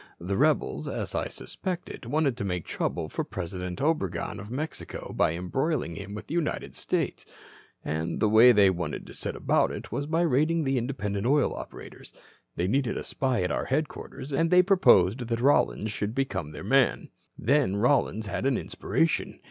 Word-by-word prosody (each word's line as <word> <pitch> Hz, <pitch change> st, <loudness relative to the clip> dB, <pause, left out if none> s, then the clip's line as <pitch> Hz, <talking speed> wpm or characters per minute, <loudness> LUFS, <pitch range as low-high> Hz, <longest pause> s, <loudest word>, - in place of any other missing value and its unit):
The 95 Hz, +3 st, -2 dB
rebels, -, -, +1 dB
as -, -, -4 dB
I -, -, -1 dB
suspected, 180 Hz, -2 st, -6 dB
wanted 145 Hz, -4 st, +1 dB
to 120 Hz, -, -3 dB
make 90 Hz, -4 st, -2 dB
trouble -, -, -2 dB
for -, -, -3 dB
President 90 Hz, 0 st, -5 dB
Obregon, 135 Hz, -, -1 dB
of 105 Hz, -, -9 dB
Mexico, 145 Hz, +6 st, -5 dB
by 80 Hz, -, +2 dB
embroiling 120 Hz, -, -1 dB
him 100 Hz, +4 st, -7 dB
with 105 Hz, 0 st, -7 dB
the 150 Hz, -, -7 dB
United 170 Hz, -3 st, -2 dB
States. -, -, -2 dB, 0.6 s
And 80 Hz, +2 st, -2 dB
the 110 Hz, -, +3 dB
way 110 Hz, +4 st, +8 dB
they 100 Hz, -4 st, +5 dB
wanted 85 Hz, -5 st, -4 dB
to -, -, -11 dB
set -, -, -5 dB
about -, -, +2 dB
it -, -, -7 dB
was 140 Hz, -, -2 dB
by 165 Hz, +2 st, +1 dB
raiding 160 Hz, +1 st, +2 dB
the 135 Hz, -2 st, +1 dB
independent 110 Hz, -4 st, -2 dB
oil 145 Hz, 0 st, +3 dB
operators. -, -, -10 dB, 0.4 s
They 90 Hz, -, 0 dB
needed 130 Hz, +3 st, 0 dB
a -, -, -4 dB
spy 130 Hz, -8 st, -1 dB
at 90 Hz, -, -1 dB
our -, -, -1 dB
headquarters, 145 Hz, 0 st, -3 dB
and 165 Hz, +4 st, +2 dB
they 180 Hz, +1 st, +6 dB
proposed 125 Hz, -, +4 dB
that 115 Hz, 0 st, -1 dB
Rollins 120 Hz, -4 st, +2 dB
should 105 Hz, +2 st, -3 dB
become 95 Hz, -, -2 dB
their 75 Hz, -, -8 dB
man. 135 Hz, +5 st, +2 dB, 0.3 s
"Then 140 Hz, -5 st, +2 dB
Rollins 110 Hz, -1 st, +2 dB
had 100 Hz, +6 st, -2 dB
an 135 Hz, -3 st, +2 dB
inspiration. 165 Hz, 0 st, -1 dB
120 Hz, 180 wpm, -27 LUFS, 95-145 Hz, 0.6 s, way